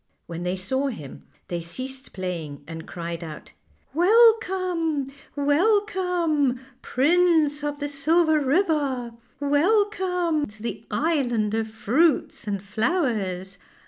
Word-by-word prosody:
When 170 0 -6
they 180 +1 -1
saw 260 +10 -1
him 155 - -8 0.2
they 175 -1 -3
ceased 260 +10 -6
playing, 165 -6 -5
and 165 0 -8
cried 170 0 -5
out: 155 -2 -9 0.2
" - - -38
Welcome! 365 - +3 0.2
welcome! 335 - +2 0.2
Prince 310 0 +2
of 290 0 -2
the 290 0 -3
Silver 315 +3 +3
River, 280 -5 +1 0.3
welcome 355 +1 +1
to 215 +1 -14
the 235 - -4
island 245 -10 0
of 225 0 0
fruits 250 +6 +1
and 200 -2 -2
flowers. 205 - -1
280 Hz, 110 wpm, -24 LUFS, 210-335 Hz, 0.3 s, Welcome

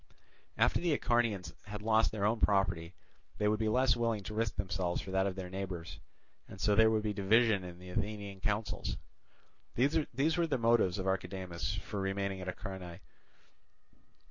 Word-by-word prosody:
After - - +3
the 170 -3 +2
Acharnians 115 -6 0
had 105 0 -7
lost 110 0 +3
their 100 -2 -1
own 110 +2 +2
property 95 -5 +1 0.4
they 105 - +1
would 105 0 +2
be 110 -1 +1
less 125 0 +4
willing 115 -3 0
to 110 - -6
risk 110 -1 -1
themselves 90 -2 -1
for 95 - -6
that 95 +1 +2
of 95 - -3
their 95 -1 -5
neighbours; 95 -3 -5 0.5
and 95 - -11
so 105 - +3
there 110 +2 +6
would 110 -1 +1
be 105 -1 -1
division 105 0 +3
in 90 -1 -8
the 90 0 -10
Athenian 100 0 -3
counsels. 105 +3 -2 0.8
These 145 +3 +1
were 170 - +3
the 140 -4 0
motives 115 -6 +3
of 95 - -3
Archidamus 95 -1 -2
for 105 - -4
remaining 95 0 -2
at 90 - -6
Acharnae. 90 -2 -6
100 Hz, 170 wpm, -33 LUFS, 95-110 Hz, 0.8 s, there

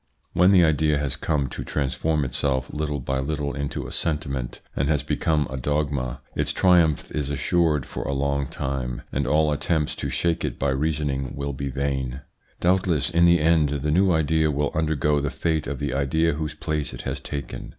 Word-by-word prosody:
When 90 +2 +5
the 90 -3 +6
idea 75 -1 +2
has 70 -1 -1
come 75 -2 0
to - - -5
transform 75 +2 0
itself 65 0 -1
little 75 -1 -2
by 65 +1 -2
little 70 +1 -2
into 70 0 -3
a - - -7
sentiment, 70 -6 -2 0.2
and 70 +2 0
has 75 -2 +1
become 75 -2 +1
a 65 - -5
dogma, 70 -2 -1
its - - 0
triumph 85 -5 +3
is 75 -2 -2
assured 75 0 +1
for - - -6
a - - -2
long 70 0 0
time, 65 -4 -3
and 70 -1 -1
all 75 +2 +3
attempts 75 +1 0
to 70 - -3
shake 85 +6 0
it - - -2
by 70 - 0
reasoning 70 -2 -1
will 70 0 -3
be 70 +1 -4
vain. 70 -1 -2 0.4
Doubtless 90 -3 +2
in 85 0 +4
the 85 0 +6
end 80 -1 +3
the 75 +1 -1
new 95 +4 +4
idea 80 -1 +2
will 75 0 0
undergo 75 -2 +1
the 70 0 -1
fate 80 0 -1
of 70 0 -3
the 70 -1 -2
idea 75 +4 +1
whose 75 0 -4
place 75 -4 -2
it - - -8
has - - -3
taken. 70 -4 -6
75 Hz, 190 wpm, -24 LUFS, 70-80 Hz, 0.4 s, the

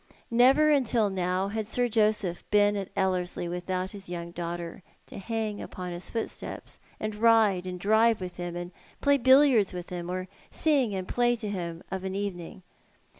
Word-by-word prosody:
Never 265 +6 +5
until 235 -7 +2
now 185 +1 -1
had 215 0 -3
Sir 245 +2 +1
Josiph 210 -5 +1
been 205 0 +4
at 195 -2 -4
Ellcrslie 185 -3 -1
without 180 +2 -3
his 195 -3 -9
young 170 -1 -5
daughter 170 +1 -5 0.2
to - - -9
hung 215 0 -3
upon 180 -1 -6
his 175 +1 -6
footsteps, 225 -1 -6 0.2
aud 215 0 -3
ride 210 -4 +3
and 180 0 -5
drive 220 +3 +3
with 180 -1 -7
him, 175 -1 -5
and 175 0 -5 0.3
play 285 0 +3
billiards 260 -5 +5
with 180 0 -7
him, 175 -1 -5
oc 185 +1 -3 0.2
sing 275 -10 +2
and 185 -1 -4
play 240 0 +2
to 220 -2 -6
him 170 -3 -5
of 190 -1 -3
an 190 0 -3
evening. 190 -2 -5
195 Hz, 175 wpm, -28 LUFS, 180-225 Hz, 0.3 s, Never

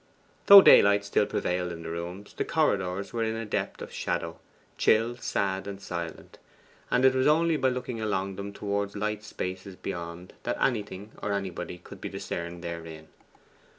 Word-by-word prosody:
Though 200 -1 +12
daylight 100 0 +7
still 100 0 +2
prevailed 90 0 -1
in 85 -1 -7
the 80 - -5
rooms, 90 +4 -6
the - - -2
corridors 100 - 0
were 115 -1 0
in 110 0 -1
a 115 0 -4
depth 105 - -3
of - - -10
shadow - - -3 0.4
chill, 115 +2 +3
sad, 95 -4 -1
and 100 -1 -6
silent; 85 -4 -7 0.5
and 125 +1 +3
it 130 - +6
was 130 0 +2
only 165 +2 +4
by 130 -3 +2
looking 125 -2 -4
along 95 -2 -1
them 100 +1 -6
towards 100 0 -3
light 105 +1 -2
spaces 95 -2 -6
beyond 85 0 -6
that - - -2
anything 105 -4 -1
or 100 - -1
anybody 95 -3 -4
could 90 - -13
be - - -4
discerned 85 0 -5
therein. 80 -2 -7
100 Hz, 170 wpm, -28 LUFS, 90-110 Hz, 0.5 s, Though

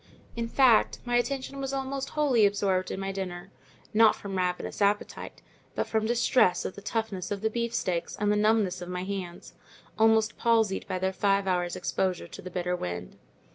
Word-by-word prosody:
In 230 0 -2
fact, 245 -2 +4
my 245 0 +2
attention 275 +2 -2
was 270 0 -3
almost 270 0 -3
wholly 255 -8 +4
absorbed 195 -2 0
in - - -4
my 195 0 -3
dinner: 190 -1 -6 0.4
not 220 0 +6
from 200 -1 -7
ravenous 180 +2 -2
appetite, 205 +1 -1 0.3
but - - 0
from 220 -1 0
distress 240 -4 +3
at - - -3
the 200 - -10
toughness 205 -4 -3
of 200 -1 -3
the 220 0 0
beefsteaks, 230 -7 -2
and 210 -1 +1
the - - +3
numbness 210 -4 +2
of 175 - -7
my 180 0 -3
hands, 185 -3 -6 0.5
almost 220 0 +3
palsied 225 -4 +2
by - - -2
their 190 +1 -1
five 200 0 +2
hours' 180 -2 0
exposure 185 0 -1
to - - -10
the 185 - -7
bitter 180 0 -2
wind. 90 - -5
200 Hz, 180 wpm, -28 LUFS, 185-230 Hz, 0.5 s, not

